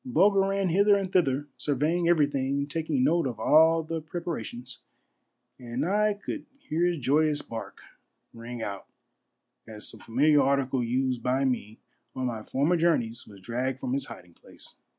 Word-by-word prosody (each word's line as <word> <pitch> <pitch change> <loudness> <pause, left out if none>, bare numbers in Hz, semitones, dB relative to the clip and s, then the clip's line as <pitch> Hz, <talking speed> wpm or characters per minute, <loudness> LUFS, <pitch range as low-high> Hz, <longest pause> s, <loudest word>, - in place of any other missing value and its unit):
Bulger 205 -6 +3
ran 195 -1 0
hither 200 +4 +4
and 195 -2 -3
thither, 145 -5 +2
surveying 155 +5 0
everything, 140 -3 +1
taking 150 -2 -1
note 165 +2 +2
of 120 -4 -6
all 160 +6 +5
the 160 +1 -4
preparations, 150 -7 -6 0.8
and 125 +4 -3
I 210 +2 +2
could 295 +9 -6
hear 165 - -1
his 175 -1 0
joyous 150 +3 +1
bark 115 -1 -8 0.5
ring 115 0 -7
out 100 -2 -6 0.8
as 110 -1 -4
some - - -5
familiar 145 +5 +3
article 135 -2 +1
used 125 +1 -1
by 130 +2 +1
me 115 -4 -2 0.4
on 130 -1 -2
my 115 -3 -3
former 145 +10 +1
journeys 120 -9 0
was 100 -2 -14
dragged 125 +5 -3
from 130 -2 -3
its 135 0 -1
hiding 90 -1 -12
place. - - -14
140 Hz, 155 wpm, -27 LUFS, 125-165 Hz, 0.8 s, all